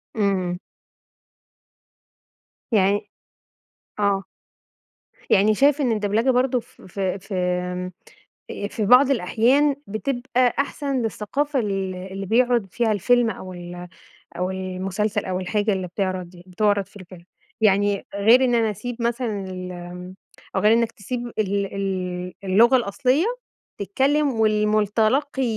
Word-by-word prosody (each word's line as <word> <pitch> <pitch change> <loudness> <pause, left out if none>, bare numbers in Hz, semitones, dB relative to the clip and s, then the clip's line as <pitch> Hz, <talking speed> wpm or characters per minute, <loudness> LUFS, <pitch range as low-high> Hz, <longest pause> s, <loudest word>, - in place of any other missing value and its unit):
إمم. 190 -4 0 2.1
يعني 200 -1 +2 0.9
آه. 200 -1 +1 1.1
يعني 210 +2 +4
شايف 285 +4 +3
إن 255 -4 +2
الدبلجة 215 +4 +1
برضه 250 0 +2
ف - - -18
في 190 +1 -3
في 195 +1 -7
آمم، 180 0 -2 0.6
آآk 205 - -5
في 215 - -2
بعض 255 +5 +6
الأحيان 260 +6 +2
بتبقى 245 +2 0
أحسن 280 -1 -1
للثقافة 265 +6 -1
ال 195 -3 -2
اللي 190 +2 -6
بيعرض 240 +1 +2
فيها 235 -2 +1
الفيلم 235 +4 +3
أو 185 -4 -7
ال 175 0 -8 0.5
أو 180 +1 -1
المسلسل 190 +2 -2
أو 185 0 -2
الحاجة 205 +3 0
اللي 185 -1 -2
بتعرض 180 -1 -4
بتعرض 200 +2 +1
في 205 - -23
الفيلم. 180 -2 -12 0.4
يعني 205 -1 +2
غير 225 +6 +5
إن 245 -2 +2
أنا 225 -2 +2
أسيب 230 +4 -6
مثلًا 235 -4 -1
ال 185 0 -6
آمم 180 +1 -9 0.4
أو 190 - +2
غير 210 +2 +5
إنك 230 0 +2
تسيب 240 +4 -5
ال 200 -1 -1
ال 180 -2 -3
اللغة 225 +7 +5
الأصلية، 255 - +1 0.5
تتكلم 265 +3 +1
والمتلقي 215 +6 +1
205 Hz, 125 wpm, -23 LUFS, 185-240 Hz, 2.1 s, بعض